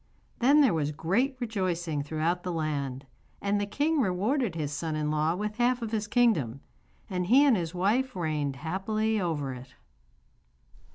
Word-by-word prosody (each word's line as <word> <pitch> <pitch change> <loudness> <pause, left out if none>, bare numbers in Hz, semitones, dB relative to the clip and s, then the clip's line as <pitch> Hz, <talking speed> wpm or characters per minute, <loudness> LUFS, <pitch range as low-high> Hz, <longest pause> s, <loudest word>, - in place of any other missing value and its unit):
Then 280 +5 +5
there 265 -10 +4
was 150 -2 0
great 200 - 0
rejoicing 180 - -2
throughout 160 +4 -1
the 180 - -4
land, 140 -5 -3 0.3
and 200 0 0
the 205 - -2
king 300 +8 +1
rewarded 215 - 0
his 150 -3 -3
son 155 +1 -3
in 150 0 -1
law 155 +2 +1
with 210 +2 -4
half 245 0 +2
of 220 - -4
his 215 -2 -1
kingdom, 185 - +2 0.5
and 180 -3 -2
he 265 +7 +6
and 270 -5 +5
his 170 -2 -3
wife 220 +8 +1
reigned 150 -5 -1
happily 205 - -1
over 145 -6 -2
it. 125 +1 -11
180 Hz, 165 wpm, -28 LUFS, 155-220 Hz, 0.5 s, he